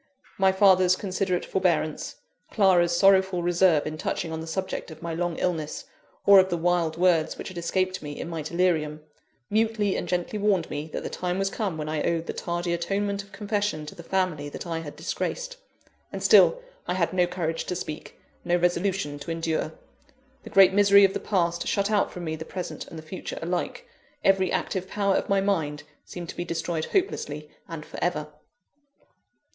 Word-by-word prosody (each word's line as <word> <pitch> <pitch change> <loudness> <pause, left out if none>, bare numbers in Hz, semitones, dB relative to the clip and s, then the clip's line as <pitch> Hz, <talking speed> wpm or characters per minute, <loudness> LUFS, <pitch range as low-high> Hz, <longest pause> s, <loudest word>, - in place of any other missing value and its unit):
My 190 0 +5
father's 185 -2 +5
considerate 185 -2 -1
forbearance, 170 -5 0 0.3
Clara's 175 -4 +3
sorrowful 190 -2 +4
reserve 175 -3 +3
in 155 0 -5
touching 165 +1 -2
on 160 0 -4
the 160 - -7
subject 190 +3 -3
of 160 0 -11
my 170 -1 -3
long 170 0 -2
illness, 160 -4 -2 0.4
or 200 -1 +9
of 190 0 +3
the 175 - 0
wild 170 -1 +1
words 170 -3 +2
which - - -6
had 185 - -10
escaped 185 +2 -1
me 145 -1 -7
in - - -4
my 165 -2 -4
delirium, 155 -2 0 0.5
mutely 215 -2 +1
and - - -3
gently 180 +4 -2
warned 200 -5 +1
me 150 +2 -4
that - - -4
the - - -4
time 180 0 -2
was 195 0 0
come 195 -8 -2
when 155 -1 -4
I 155 -1 -1
owed 165 +1 0
the - - -4
tardy 175 0 -2
atonement 200 +4 -1
of 200 0 -17
confession 205 -6 -2
to 150 - -8
the - - -10
family 170 -5 -1
that - - -7
I 165 -1 -3
had 150 -3 -8
disgraced; - - -4 0.5
and - - -5
still, - - +6 0.2
I 180 - 0
had 175 -1 0
no 180 -1 +3
courage 165 -2 -3
to 180 - -3
speak, 155 -3 -7 0.2
no 175 - +1
resolution 175 -3 0
to 145 - -8
endure. 165 -1 -1 0.7
The - - -10
great 190 -1 +6
misery 200 0 +7
of 195 - +1
the - - -2
past, 170 -4 0
shut 200 +1 +1
out 205 -2 +2
from 180 - -7
me 160 -1 -2
the 160 - -6
present 180 +2 -6
and 165 - -10
the 155 - -8
future 170 +4 -7
alike 180 +9 -3 0.4
every 190 -1 +3
active 185 -1 -2
power 200 0 +1
of - - -1
my 195 0 +3
mind 160 -7 -1 0.2
seemed 175 -2 -8
to - - -6
be 175 - -3
destroyed 165 -1 -2
hopelessly 150 - -2 0.2
and 165 -2 -7
for - - -6
ever. 150 -4 -1
175 Hz, 195 wpm, -26 LUFS, 160-195 Hz, 0.7 s, or